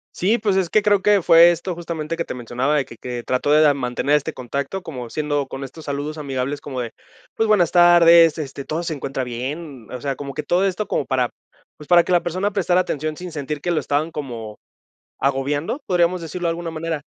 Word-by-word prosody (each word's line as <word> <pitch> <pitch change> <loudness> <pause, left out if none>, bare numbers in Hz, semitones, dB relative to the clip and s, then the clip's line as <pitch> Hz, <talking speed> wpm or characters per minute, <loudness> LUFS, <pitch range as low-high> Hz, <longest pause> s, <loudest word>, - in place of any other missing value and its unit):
Sí, 210 +6 +2
pues 205 -3 +1
es 190 -3 +1
que 215 - +3
creo 205 -1 +3
que 205 0 +4
fue 165 +1 +7
esto 175 +1 -3
justamente 165 -1 -4
que 170 - -2
te - - -5
mencionaba 125 +4 -1
de 140 -4 +1
que 115 - -13
que 120 0 -6
trató 130 +3 0
de 150 -1 +6
mantener 135 +2 0
este 150 - -1
contacto 140 +9 -4
como 125 -9 -7
siendo 145 0 -1
con 135 +1 -7
estos 155 +4 -10
saludos 145 +2 -4
amigables 140 -1 -3
como 130 -3 -5
de 115 -2 -5 0.4
pues 225 - +1
buenas 195 -6 +3
tardes, 170 -2 +7
este 140 -2 -6
¿todo 155 +2 -2
se 165 - -3
encuentra 135 -1 -4
bien? 130 +1 -6
O 125 - -6
sea, 140 -1 -2
como 140 +1 -7
que - - -3
todo 180 +3 +2
esto 195 +2 -2
como 140 - -1
para, 130 -2 0 0.5
pues 150 - -13
para 175 -1 +6
que 180 - -4
la 175 - +3
persona 185 +4 -1
prestara 185 -2 +2
atención 155 -3 -3
sin 180 +2 -8
sentir 145 -1 -5
que 180 - -3
lo 165 - +1
estaban 150 +3 -1
como 115 -8 -7 0.6
agobiando. 145 - -1
Podríamos 180 0 +2
decirlo 170 +2 -4
de - - +2
alguna 165 0 -4
manera. 160 -1 -4
155 Hz, 220 wpm, -21 LUFS, 135-175 Hz, 0.6 s, fue